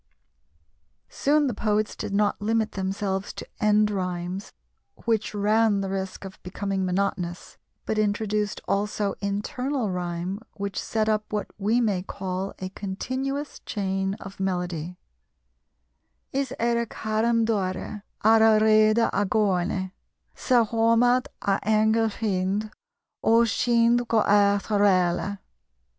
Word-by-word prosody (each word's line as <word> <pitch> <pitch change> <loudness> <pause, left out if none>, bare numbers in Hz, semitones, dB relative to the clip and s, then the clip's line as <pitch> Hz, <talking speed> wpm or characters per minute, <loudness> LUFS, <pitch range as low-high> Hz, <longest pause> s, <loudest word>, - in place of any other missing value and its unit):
Soon 295 +1 +2
the 255 - 0
poets 210 0 0
did - - -5
not 205 +1 +1
limit 220 +1 +1
themselves 195 0 -2
to - - -7
end 210 0 +3
rhymes, 180 0 -3 0.5
which 220 -2 0
ran 210 0 +3
the 195 -1 -3
risk 190 0 -4
of 190 0 -10
becoming 195 +1 -3
monotonous, 180 -1 -2 0.3
but 215 - -1
introduced 210 0 0
also 200 +1 0
internal 215 +4 -2
rhyme, 180 +2 -3
which 200 -1 -4
set 220 -1 -1
up 215 -1 0
what 210 -1 -1
we 215 +4 +2
may 205 -6 +1
call 190 0 -4
a 185 - -5
continuous 260 +9 -4
chain 195 -1 -2
of 195 -1 -11
melody: 180 -2 -2 1.3
is 270 -1 -1
aire 235 0 +1
caraim 225 +2 0
DOIRE 200 -1 -2 0.2
ar 220 +1 +6
a 220 -1 +6
reidhe 215 0 +5 0.2
ar 200 - +1
a - - +2
ghlOINE 190 -2 0 0.4
's - - -8
ar 240 -2 +6
iomad 230 +3 +3 0.2
a 195 -1 +2
aingel 220 +1 +3
fIND 205 0 -1 0.5
ó 230 +1 +5
'n - - +4
CIND 235 +1 +2
go 225 -2 +3
aoich 200 +1 +3
arOILE. 200 -1 +2
205 Hz, 130 wpm, -25 LUFS, 195-225 Hz, 1.3 s, ar